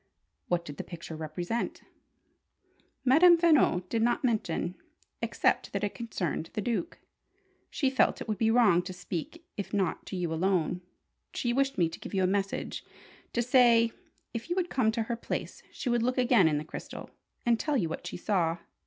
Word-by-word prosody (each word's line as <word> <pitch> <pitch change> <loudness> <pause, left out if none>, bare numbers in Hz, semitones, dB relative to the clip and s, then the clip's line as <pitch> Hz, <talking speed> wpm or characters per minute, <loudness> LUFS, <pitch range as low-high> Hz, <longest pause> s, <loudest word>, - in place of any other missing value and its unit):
"What 175 -1 0
did 145 -3 -8
the - - -4
picture 165 -2 -8
represent?" 175 +8 -3 1.2
"Madame 335 +7 +7
Veno 305 - +4
did 225 +4 -1
not 240 +4 +1
mention, 205 -7 0 0.5
except - - +1
that - - -2
it 205 - -1
concerned 185 -8 -3
the - - -2
Duke. 240 - -2 0.7
She 270 -3 0
felt 265 - +2
it - - -6
would 215 -3 -2
be 225 - +3
wrong 225 -7 +5
to 185 +1 -7
speak 185 - -6
if 200 0 -4
not 190 -4 -1
to - - -5
you 175 -3 -2
alone. 180 0 +1 0.5
She 240 -1 0
wished 275 +1 +1
me 175 -3 +3
to 165 - -9
give - - -7
you 190 - +2
a - - +4
message: 195 +1 -1 0.5
to 240 - +1
say, 235 -2 +5 0.4
if 230 +7 -5
you 350 - 0
would 360 -2 -1
come 230 -4 +2
to 225 0 -1
her 235 +2 -2
place, 235 - -5
she - - -6
would 240 -1 +2
look 250 +3 0
again 245 -8 +5
in 150 -2 +2
the 150 - -4
crystal, - - -8 0.3
and 235 -1 +3
tell 300 -2 0
you 180 -9 +1
what 160 - -5
she - - -5
saw. 175 -4 0
220 Hz, 190 wpm, -29 LUFS, 175-245 Hz, 1.2 s, Madame